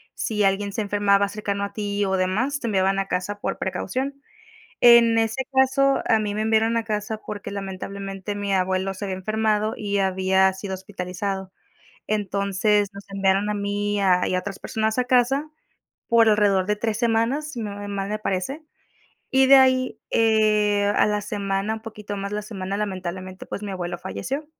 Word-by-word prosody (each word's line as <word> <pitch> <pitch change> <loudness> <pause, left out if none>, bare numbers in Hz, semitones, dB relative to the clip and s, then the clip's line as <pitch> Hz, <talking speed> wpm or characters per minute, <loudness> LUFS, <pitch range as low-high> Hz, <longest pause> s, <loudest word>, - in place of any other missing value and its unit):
si 210 -2 -1
alguien 195 +1 +1
se 220 - -1
enfermaba 200 -1 +2
cercano 200 -1 -3
a 200 - -4
ti 205 -1 -1
o 190 0 0
demás, 215 +10 0
te 235 - -4
enviaban 195 -2 +2
a 195 - -2
casa 200 +3 -3
por - - -3
precaución. 265 +9 -3 0.6
En 235 -1 +7
ese 225 +4 0
caso, 265 +1 +3
a 225 - +4
mí 210 -1 -2
me 210 - -2
enviaron 220 +1 +2
a 230 - 0
casa 215 0 -3
porque 205 -1 -6
lamentablemente, 195 0 -5
mi 205 0 -3
abuelo 190 +1 0
se 200 - -5
había 190 -1 -3
enfermado 215 +2 0
y 205 -1 -1
había 190 0 +3
sido 190 0 -6
hospitalizado. 190 0 -5 0.5
Entonces, 200 0 +1
nos 200 0 -12
enviaron 195 +1 +1
a - - 0
mí 205 0 -1
y 205 - 0
a 185 -2 +3
y 185 - 0
a - - +2
otras 195 +1 -7
personas 220 +2 -1
a 250 - +1
casa 260 +4 +2 0.6
por 230 -1 +5
alrededor 205 -3 +3
de 210 +2 0
3 215 0 -2
semanas, 235 +7 0
si 235 - -5
no 205 -2 -5
me 205 0 -6
mal 200 -1 -3
me 215 +1 -2
parece. 205 - -2 0.7
Y 265 0 +4
de 275 - +9
ahí, 260 -1 +4
eh, 210 -2 +3
a - - +4
la 210 0 0
semana, 200 +1 -2
un 220 - -9
poquito 210 -2 -7
más 200 +1 -4
la 210 - -2
semana, 195 -2 -5
lamentablemente, 185 -2 -5
pues - - -6
mi 200 - -4
abuelo 175 -2 -4
falleció. 270 - -4
205 Hz, 185 wpm, -23 LUFS, 195-220 Hz, 0.7 s, de